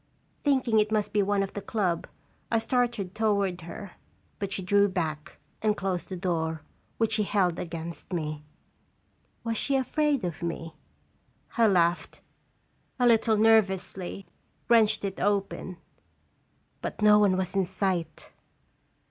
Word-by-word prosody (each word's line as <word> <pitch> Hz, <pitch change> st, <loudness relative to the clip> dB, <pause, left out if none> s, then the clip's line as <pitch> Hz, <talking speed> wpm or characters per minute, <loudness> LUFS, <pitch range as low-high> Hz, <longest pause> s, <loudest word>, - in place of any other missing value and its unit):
Thinking 260 Hz, -6 st, +3 dB
it 210 Hz, 0 st, +1 dB
must 210 Hz, -1 st, 0 dB
be 205 Hz, -, +3 dB
one 200 Hz, 0 st, +1 dB
of 195 Hz, -, -6 dB
the 205 Hz, -, -5 dB
club, 185 Hz, -6 st, -1 dB, 0.4 s
I 230 Hz, -, +2 dB
started 225 Hz, -4 st, 0 dB
toward 200 Hz, -5 st, 0 dB
her, 180 Hz, +4 st, -8 dB, 0.5 s
but 200 Hz, -1 st, -3 dB
she 190 Hz, -, -3 dB
drew 200 Hz, +2 st, +4 dB
back 160 Hz, -5 st, -4 dB, 0.2 s
and 210 Hz, -1 st, +1 dB
closed 185 Hz, -2 st, -2 dB
the 190 Hz, -, -4 dB
door, 160 Hz, -4 st, -2 dB, 0.3 s
which 225 Hz, -1 st, +1 dB
she 215 Hz, -1 st, +1 dB
held 190 Hz, -4 st, +1 dB
against 165 Hz, 0 st, -6 dB
me. 155 Hz, -3 st, -3 dB, 1.0 s
Was 230 Hz, -1 st, -2 dB
she 275 Hz, -, 0 dB
afraid 275 Hz, -2 st, +1 dB
of 170 Hz, -3 st, -4 dB
me? 165 Hz, -1 st, -4 dB, 0.8 s
I 230 Hz, -1 st, +5 dB
laughed, 175 Hz, -3 st, +1 dB, 0.8 s
a 250 Hz, -, +2 dB
little 225 Hz, -2 st, +4 dB
nervously, 195 Hz, -3 st, +2 dB, 0.4 s
wrenched 220 Hz, -3 st, +4 dB
it 195 Hz, -1 st, -4 dB
open 195 Hz, -2 st, -1 dB, 1.0 s
but -, -, -4 dB
no 210 Hz, 0 st, +7 dB
one 195 Hz, -3 st, +3 dB
was 185 Hz, -1 st, -2 dB
in 195 Hz, -1 st, +2 dB
sight! 180 Hz, -4 st, -2 dB
200 Hz, 140 wpm, -27 LUFS, 180-220 Hz, 1.0 s, no